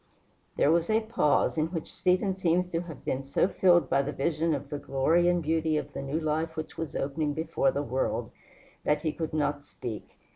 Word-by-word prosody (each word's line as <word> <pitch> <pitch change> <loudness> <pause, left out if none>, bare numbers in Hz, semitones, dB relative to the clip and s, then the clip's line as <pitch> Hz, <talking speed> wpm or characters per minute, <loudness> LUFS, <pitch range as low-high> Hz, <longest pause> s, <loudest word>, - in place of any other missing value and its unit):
There 145 - +4
was 170 +2 +2
a 220 +1 +3
pause, 220 -8 +1
in 155 - +2
which 165 -2 -6
Stephen 185 +1 +1
seems 180 0 +1
to 165 - 0
have 165 -6 -10
been 130 - -1
so 140 +5 +1
filled 175 -6 +4
by 140 - +3
the 140 +1 -3
vision 160 +2 0
of 140 0 -7
the 145 - -3
glory 155 +6 +2
and 175 -1 +1
beauty 160 0 +1
of 145 -1 -4
the - - -4
new 140 +3 -2
life 160 +1 -1
which 155 0 -6
was 165 -3 -5
opening 145 +1 -1
before 460 - +1
the - - -2
world, - - -1 0.5
that - - +1
he 155 - +1
could 160 -2 -4
not 145 -2 -1
speak. 120 -6 -8
160 Hz, 210 wpm, -28 LUFS, 145-175 Hz, 0.5 s, There